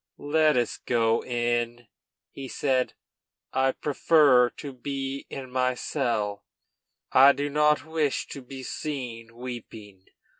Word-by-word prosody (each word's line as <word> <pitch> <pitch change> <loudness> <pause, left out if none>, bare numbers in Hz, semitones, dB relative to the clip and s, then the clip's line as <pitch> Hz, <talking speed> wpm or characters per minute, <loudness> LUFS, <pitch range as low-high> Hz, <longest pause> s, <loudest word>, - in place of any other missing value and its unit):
"Let 155 0 +2
us 120 -2 0
go 115 -1 +1
in," 120 -1 -1 0.4
he 135 -1 -8
said; 130 -1 0 0.6
"I 130 0 +3
prefer 145 -4 +4
to 140 +2 -9
be 135 +1 -5
in 130 -2 -7
my 125 0 +1
cell. 110 -8 -2 0.7
I 135 +2 +8
do 145 +1 -3
not 150 -1 +3
wish 160 -3 -1
to 140 - -7
be 130 +1 -9
seen 120 -6 -5
weeping. 110 -6 -9
130 Hz, 120 wpm, -26 LUFS, 120-140 Hz, 0.7 s, I